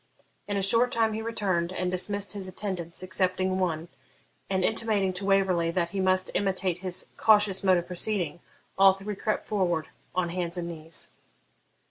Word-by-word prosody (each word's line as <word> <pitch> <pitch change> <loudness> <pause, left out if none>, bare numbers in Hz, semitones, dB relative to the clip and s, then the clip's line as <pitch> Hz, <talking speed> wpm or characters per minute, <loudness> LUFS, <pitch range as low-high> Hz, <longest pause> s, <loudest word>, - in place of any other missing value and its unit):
In 205 -1 -1
a 195 - 0
short 230 +5 +2
time 225 -4 +1
he 220 - -3
returned, 190 -6 -1
and 180 -1 -2
dismissed 200 +3 0
his 195 -2 -3
attendants 185 -3 -4
excepting 185 0 +1
one; 165 -3 -1 0.6
and, 190 -1 +1
intimating 215 -4 +1
to 190 +2 -4
Waverley 190 -4 +2
that 170 0 0
he 195 - -4
must 185 0 +2
imitate 190 -3 0
his 185 0 -3
cautious 205 -3 +4
mode 185 -2 +5
of 175 - -2
proceeding, 180 -1 -1 0.4
all 195 0 +8
three 195 +2 -6
crept 215 +2 -2
forward 175 -7 0 0.3
on 180 -2 +1
hands 175 0 -2
and 170 -1 -3
knees. 165 -1 -4
185 Hz, 165 wpm, -27 LUFS, 175-200 Hz, 0.6 s, all